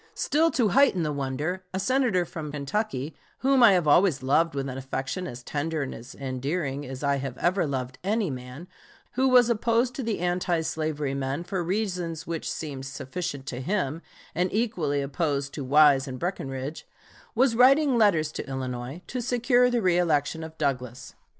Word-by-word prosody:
Still 320 +3 +2
to 230 -5 +3
heighten 260 -10 +4
the 150 -1 -1
wonder, 145 +7 -3
a - - 0
Senator 240 -6 +2
from 155 -2 -6
Kentucky, 150 - -3 0.3
whom 270 0 +4
I 230 -4 +8
have 175 -4 +2
always 150 -3 +4
loved 160 +4 +2
with 140 0 -2
an 130 - -5
affection 135 +6 -4
as 120 -3 -8
tender 150 +3 -2
and 135 - -5 0.2
endearing 140 +2 -3
as 130 +2 -7
I 140 -1 +2
have 135 -2 -5
ever 175 -1 +1
loved 130 -1 -4
any 205 -3 0
man, 125 +6 -8 0.4
who 260 +2 +2
was 250 -2 +6
opposed 235 +2 +1
to - - -4
the 225 -3 -1
anti 175 -1 0
slavery 155 -3 -2
men 140 +3 -2
for 185 0 -3
reasons 180 -4 -2
which 165 -1 -4
seemed 135 -4 -5
sufficient 135 +1 -5
to 130 -1 -5
him 165 -1 -1 0.3
and 180 +2 0
equally 170 -11 0
opposed 140 0 -2
to 145 - -5
Wise 140 0 +5
and 130 -1 -5
Breckinridge, 140 -4 -4 0.5
was 245 0 +3
writing 270 +3 +5
letters 180 -9 +3
to - - -6
Illinois 130 +4 -5
to 250 - -4
secure 245 +1 +3
the 240 -1 +1
reëlection 165 -4 +1
of 160 0 -9
Douglas. 125 -4 -3
160 Hz, 170 wpm, -26 LUFS, 135-200 Hz, 0.5 s, I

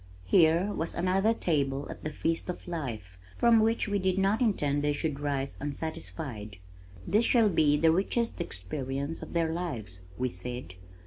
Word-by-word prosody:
Here 170 - +4
was 165 - -2
another 190 +4 +2
table 140 -9 0
at - - -10
"the 155 - -2
feast 165 +3 -2
of 180 - -5
life" 115 - -5 0.2
from 235 -1 +5
which 225 +1 +2
we 205 -1 0
did 185 0 +1
not 195 +5 +2
intend 145 - +1
they 145 0 +2
should 145 -1 -2
rise 140 -2 -2
unsatisfied. 145 -8 -5 0.5
"This 215 - +3
shall 230 -3 +4
be 150 -5 +3
the 160 +2 +4
richest 200 +4 0
experience 135 - -4
of - - -8
their 165 -1 +1
lives," 120 - -4 0.2
we 130 0 0
said. 120 0 -6
160 Hz, 165 wpm, -29 LUFS, 135-185 Hz, 0.5 s, from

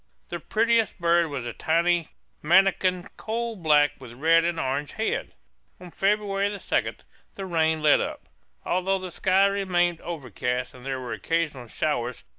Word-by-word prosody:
The 175 - -4
prettiest 225 +4 +1
bird 170 0 +3
was 140 -5 -5
a 120 - -4
tiny 170 +3 +1 0.3
manakin, 185 +1 +3
coal 230 +1 -3
black, 150 -5 +4
with 125 -3 -11
a - - -14
red 165 +5 +4
and 170 -1 -1
orange 140 0 -2
head. 220 - -2 0.4
On 180 -1 -11
February 200 0 +1
2 - - -1 0.4
the 195 - -5
rain 160 -3 +1
let 150 - +5
up, - - -5 0.4
although 185 +2 +1
the 185 -1 -7
sky 190 +2 +3
remained 180 -4 +1
overcast 125 - -3
and 125 -1 -14
there 135 0 -3
were 125 -3 -5
occasional 145 +2 -2
showers. 125 -1 -2
170 Hz, 155 wpm, -25 LUFS, 145-190 Hz, 0.4 s, let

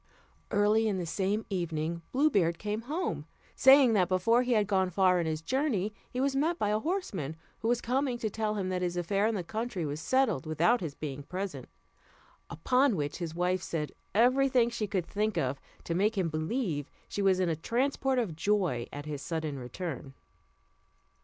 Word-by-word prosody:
Early 215 +2 +3
in 200 -3 0
the 180 - -2
same 195 +5 -1
evening 170 -2 -2
Blue 295 +4 +3
Beard 170 -6 +2
came 210 +1 -3
home, 345 +5 -2 0.3
saying, 265 -3 +7
that 185 -4 +3
before 210 +6 +3
he 250 -1 +1
had 210 -2 +3
gone 190 -2 +1
far 185 0 +3
on 170 - -1
his 155 0 -2
journey 225 - 0 0.2
he 250 - -4
was 270 +1 +1
met 320 +5 +1
by 210 - 0
a 210 +1 +1
horseman, 220 - -3 0.2
who 220 - -2
was 240 0 +2
coming 255 +1 0
to 230 - -2
tell 215 0 -2
him 190 -3 -2
that 185 -1 -1
his 175 -1 -1
affair 195 +4 +1
in 225 - 0
the 185 - -2
country 215 -2 -3
was 145 +1 -3
settled 220 - +1
without 170 +10 +2
his 155 -5 -4
being 145 -2 -5
present; 175 -4 -5 0.8
upon 250 - +2
which 145 -3 -2
his 165 -2 -4
wife 180 +1 +1
said 150 -3 -3 0.2
every 255 +5 +4
thing 240 -2 +3
she 225 -3 -2
could 190 -4 -1
think 210 +2 -1
of, 130 +1 -1 0.2
to 170 - -3
make 205 +5 +1
him 180 -3 +1
believe 155 - -2 0.2
she 205 - -3
was 190 -2 +3
in 185 - +2
a 165 - +1
transport 260 - 0
of 215 -10 -1
joy 175 - 0
at 145 0 -7
his 150 -2 -5
sudden 155 -3 -3
return. 135 +1 -6
195 Hz, 195 wpm, -30 LUFS, 165-235 Hz, 0.8 s, saying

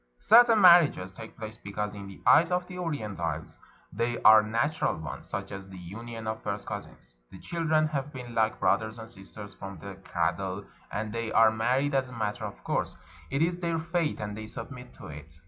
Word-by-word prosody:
Certain 230 - +6
marriages 170 - +6
take 110 +4 -11
place 110 0 -7
because 105 0 -4
in 100 -1 -8
the 100 - -11
eyes 165 +3 +6
of 180 0 0
the 180 - -10
Orientals 100 - -4 0.3
they 120 0 -1
are 110 0 +9
natural 115 +8 0
ones, 80 -2 -7
such 100 0 -4
as 95 -1 -8
the 95 - -10
union 115 +6 -8
of 110 0 -3
first - - -4
cousins. - - -8 0.2
The - - -12
children 155 - +1
have 145 -1 -3
been 125 -4 -8
like 110 -1 +1
brother 110 +2 +2
and 110 -1 -8
sister 100 0 -8
from 95 -1 -7
the 100 +4 -8
cradle, 95 +3 -2 0.3
and 105 +1 -3
they 115 -1 -3
are 115 -1 +6
married 125 +6 +1
as 135 -1 +1
a - - -11
matter 110 -1 -3
of 100 - -8
course; - - -1 0.3
it 140 +3 +1
is 175 +1 0
their 170 -2 -1
fate, 165 -1 -1
and 105 -1 -4
they 110 0 -7
submit 125 +2 -8
to - - -12
it. 75 +2 -10
110 Hz, 200 wpm, -28 LUFS, 100-145 Hz, 0.3 s, are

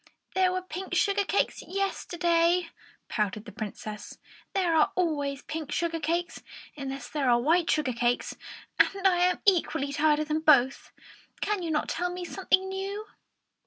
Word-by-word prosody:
"There 375 -1 +3
were 370 0 -2
pink 370 +1 -5
sugar 400 +4 +2
cakes 400 - 0
yesterday," 345 -3 +1 0.4
pouted 210 0 -2
the 210 - -9
Princess. 215 0 -7 0.4
"There 360 -4 +2
are 310 - +4
always 290 -6 -1
pink 310 -2 -5
sugar 335 -1 -1
cakes 340 +3 -2 0.3
unless 270 -3 -5
there 275 -1 0
are 240 0 +5
white 325 +6 +2
sugar 295 -5 +1
cakes, 240 +1 0 0.4
and 390 0 +4
I 365 -2 +3
am 360 0 +2
equally 320 -7 +2
tired 300 +1 +3
of 305 0 -2
them 310 +1 0
both. 275 -4 +4 0.5
Can 415 -2 -1
you 335 - -3
not 305 -1 0
tell 355 +1 -1
me 360 0 -5
something 380 +1 +1
new?" 390 +2 -4
330 Hz, 160 wpm, -28 LUFS, 280-365 Hz, 0.5 s, are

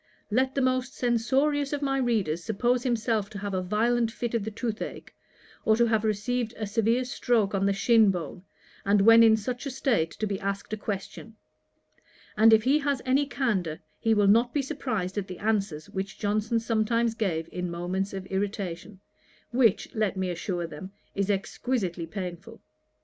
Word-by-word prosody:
Let 260 +4 +1
the 275 - +1
most 255 +1 0
censorious 270 +5 +1
of 290 0 -2
my 270 -1 +1
readers 205 -10 0
suppose 240 +5 +1
himself 225 -4 0
to 215 - -8
have 200 0 -4
a 185 - 0
violent 230 +5 +1
fit 235 +1 -4
of 230 -3 0
the 220 - -3
tooth 220 +1 -4
ach, - - -7 0.5
or 220 - +4
to 235 +1 +3
have 220 -2 +1
received 225 +2 -1
a 220 - -3
severe 225 +4 +1
stroke 235 -5 +1
on 195 0 +1
the - - +3
shin 220 +1 +4
bone, 180 0 -4 0.4
and 200 0 +3
when 230 +2 +8
in 220 -1 +6
such 245 +5 -4
a - - -2
state 245 -11 +1
to 215 - -4
be 200 -2 -2
asked 200 +1 -4
a - - +2
question; 205 +2 -6 1.0
and 220 +1 +6
if 220 -1 +6
he 275 +5 +3
has 280 -3 -1
any 270 +2 +2
candour, 190 - -1 0.2
he 225 -1 +2
will 205 -1 +3
not 235 +5 +4
be 285 - +2
surprized 220 -10 -3
at 195 - -5
the 185 - -7
answers 200 -8 -1
which 195 0 -5
Johnson 215 +3 0
sometimes 230 0 +1
gave 175 -8 -2
in 180 0 -3
moments 180 +3 -2
of 195 -1 -6
irritation, 195 -1 -4 0.5
which, 240 -4 +2
let 215 -4 0
me 185 -1 -1
assure 175 0 -3
them, 165 +4 -9 0.2
is 200 0 -1
exquisitely 195 -3 -2
painful. 180 -1 -7
215 Hz, 180 wpm, -27 LUFS, 195-240 Hz, 1.0 s, when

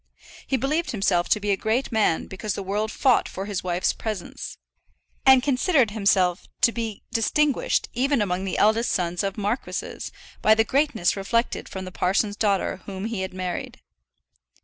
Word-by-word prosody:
He 265 - +1
believed 300 +7 0
himself 195 -5 +1
to - - +3
be 205 0 -1
a - - +4
great 220 +7 -1
man 215 -7 +2
because 195 +1 -4
the 200 - -4
world 210 +3 -1
fought 255 0 +2
for 195 - -5
his 200 -2 -3
wife's 180 0 0
presence; 215 -5 -6 0.7
and 265 -1 +7
considered 270 - +2
himself 195 -4 +2
to 235 - +5
be 225 -3 -4
distinguished 280 +5 +1
even 270 +2 +1
among 190 -3 -1
the 190 - -2
eldest 220 +3 +3
sons 175 -2 -1
of 195 0 -3
marquises, 210 +4 -3 0.3
by 215 - +6
the 225 - +4
greatness 265 - +1
reflected 230 +4 -1
from 190 -1 -6
the 185 - -7
parson's 200 +3 0
daughter 200 -4 0
whom 195 0 -5
he 225 -4 -3
had 190 - -3
married. 185 -1 -4
210 Hz, 170 wpm, -24 LUFS, 190-235 Hz, 0.7 s, and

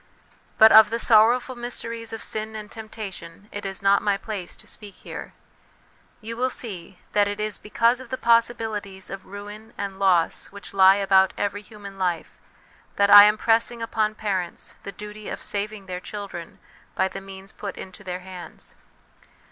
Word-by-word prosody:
But 220 0 +8
of 220 -1 +9
the 230 - -1
sorrowful 235 +3 +4
mysteries 230 -1 -4
of 225 - -5
sin 220 0 -2
and 210 -1 -8
temptation 205 -4 -8
it 205 -1 -5
is 195 0 -7
not 200 0 +4
my 205 -1 +1
place 200 -3 -6
to - - -11
speak 205 -3 -7
here; - - -9 0.9
you 225 +1 -6
will 255 +2 +1
see 190 -7 -6
that 205 -1 +3
it 205 +1 -4
is 215 -1 -2
because 230 +4 +2
of 255 - -12
the 260 - -3
possibilities 225 -5 0
of 195 -1 -8
ruin 205 +3 -10
and 195 -1 -5
loss 180 -4 +2
which 200 -1 -11
lie 190 0 +7
about 190 -1 +4
every 205 0 -2
human 205 -2 -12
life 175 -3 -2 0.6
that 200 0 +3
I 205 0 +12
am 210 +1 +4
pressing 230 +1 +1
upon 215 -1 0
parents 190 -5 -3
the 200 - -7
duty 210 +2 -9
of - - -6
saving 205 0 -3
their 180 -1 -5
children 195 -4 -8 0.4
by - - +2
the 195 +1 -7
means 195 0 -11
put 200 - -7
into 190 +1 -10
their 180 -1 -5
hands. 180 -1 -9
205 Hz, 170 wpm, -24 LUFS, 195-220 Hz, 0.9 s, I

